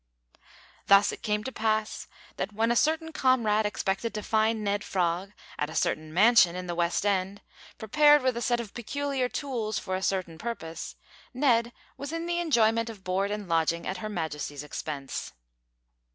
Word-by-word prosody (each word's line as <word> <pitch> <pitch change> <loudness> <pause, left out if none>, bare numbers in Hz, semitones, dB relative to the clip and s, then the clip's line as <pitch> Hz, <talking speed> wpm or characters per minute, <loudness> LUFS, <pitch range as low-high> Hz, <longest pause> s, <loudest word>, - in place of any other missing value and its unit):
Thus 200 0 +6
it - - -8
came 210 -1 -1
to 265 - -4
pass, 220 -2 -1 0.3
that - - -3
when 225 +3 +1
a - - +2
certain 320 +4 +1
comrade 225 -7 +2
expected 205 +2 -2
to 210 - -3
find 220 0 +1
Ned 205 0 0
Frog 180 +1 -1 0.3
at 150 - -1
a 160 - -8
certain 155 0 -1
mansion 190 -1 +5
in 180 0 -5
the 175 - -3
West 170 +3 0
end, 195 0 0 0.4
prepared 295 +5 +5
with 255 -2 +1
a 235 - -3
set 240 0 +1
of 225 -4 -6
peculiar 270 +1 -2
tools 235 -8 -3
for 185 -1 -3
a 185 - -3
certain 185 -4 -2
purpose, 165 -8 -6 0.4
Ned 240 -3 +3 0.3
was 280 +1 -6
in 330 0 -3
the 345 0 -1
enjoyment 230 -8 +2
of 210 -4 -10
board 190 +2 0
and 205 -1 -4
lodging 165 0 +1
at 190 - -3
Her 215 +3 -5
Majesty's 150 -6 -4
expense. 145 -2 -5
210 Hz, 175 wpm, -28 LUFS, 185-235 Hz, 0.4 s, Thus